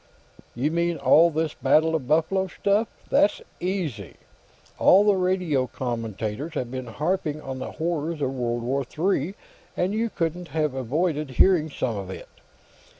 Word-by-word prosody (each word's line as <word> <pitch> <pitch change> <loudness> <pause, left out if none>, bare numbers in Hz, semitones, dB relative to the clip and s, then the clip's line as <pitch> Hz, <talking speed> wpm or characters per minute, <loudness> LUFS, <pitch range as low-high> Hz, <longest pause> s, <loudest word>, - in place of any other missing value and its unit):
"You 135 +6 0
mean 170 0 0
all 150 +5 +5
this 160 -1 -1
Battle 155 +5 +3
of 150 -6 -2
Buffalo 165 +6 +2
stuff? 205 +4 +1 0.2
That's 205 - +4 0.2
easy. 165 - -3 0.6
All 195 +2 +6
the 205 -1 +4
radio 180 -8 +1
commentators 115 - -4
have 125 -4 -3
been 130 -1 -5
harping 155 +4 -1
on 135 -3 -6
the - - -6
horrors 165 -1 -2
of 135 -2 -1
World 120 -2 -2
War 135 +3 0
III, 170 +4 -1 0.4
and 185 +3 0
you 225 +2 0
couldn't 175 -1 -3
have 155 -4 -1
avoided 150 +4 -1
hearing 160 +4 +4
some 120 -6 -2
of 95 -2 -6
it. 95 - -8
155 Hz, 150 wpm, -25 LUFS, 130-175 Hz, 0.6 s, All